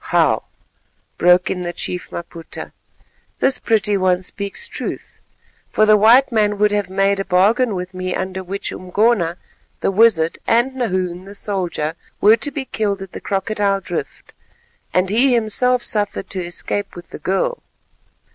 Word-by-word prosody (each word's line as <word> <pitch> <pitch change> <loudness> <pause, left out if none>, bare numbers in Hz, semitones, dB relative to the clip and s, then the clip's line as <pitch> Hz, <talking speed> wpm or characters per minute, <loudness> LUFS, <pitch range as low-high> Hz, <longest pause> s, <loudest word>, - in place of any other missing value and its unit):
"Wow!" - - +3 0.7
broke 180 +1 +4
in 180 - -3
the 175 -1 -4
chief 180 0 -4
Maputa, 170 -1 -8 0.7
"this 265 -1 +2
pretty 210 -3 +2
one 185 -1 +1
speaks 200 +2 -3
truth, - - -6 0.5
for 215 - +3
the 215 0 +6
white 235 +6 +5
man 210 -2 +2
would 210 0 +3
have 205 -3 -1
made 195 +1 +1
a - - 0
bargain 205 +5 +2
with 180 +1 -5
me 185 0 -3
under 190 0 -4
which 195 +2 -4
Umgona, 185 -2 +1 0.4
the - - +1
wizard, 195 -6 +3
and 240 +3 +3
Nahoon, 185 -7 -2
the 200 +1 -9
soldier, 180 -7 -2 0.3
were 215 +2 +6
to 230 +6 +1
be 275 -1 -5
killed 200 -5 -2
at 190 - -11
the - - -8
Crocodile 200 0 0
Drift, 180 -3 -6 0.6
and 185 +1 +1
he 245 +4 +4
himself 240 +3 +2
suffered 205 -2 -2
to 185 -3 -2
escape 195 +3 -4
with 175 - -11
the - - -8
girl. 340 - -1
200 Hz, 155 wpm, -19 LUFS, 185-220 Hz, 0.7 s, the